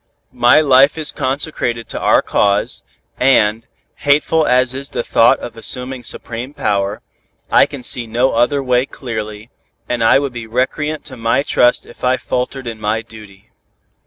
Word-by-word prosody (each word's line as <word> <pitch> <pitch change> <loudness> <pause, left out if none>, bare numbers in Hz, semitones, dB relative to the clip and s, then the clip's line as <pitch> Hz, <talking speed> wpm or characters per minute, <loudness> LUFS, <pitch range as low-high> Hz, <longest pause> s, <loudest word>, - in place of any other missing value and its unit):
My 120 +4 +5
life 140 +1 +4
is 155 -2 -1
consecrated 130 -4 -3
to - - -4
our - - +3
cause, 100 0 0 0.4
and, 115 -4 +2 0.3
hateful 150 +2 +2
as 125 0 +2
is 135 +1 -4
the - - -3
thought 115 - +4
of 120 - -8
assuming 125 +3 -2
supreme 120 +4 -6
power, 100 -2 -1 0.5
I - - +5
can 135 -3 -9
see 120 -1 0
no 120 +4 +1
other 120 +4 +1
way 125 0 +1
clearly, 110 -3 -7 0.4
and 120 -2 -1
I 115 - +5
would 140 -2 -2
be 120 -2 -7
recreant 150 +6 -2
to 130 -3 -9
my 115 +4 +1
trust 125 -3 +2
if - - -17
I 130 0 +2
faltered 130 +2 -4
in 115 -2 -7
my 110 +2 -1
duty. 105 -4 -15
125 Hz, 160 wpm, -17 LUFS, 115-135 Hz, 0.5 s, My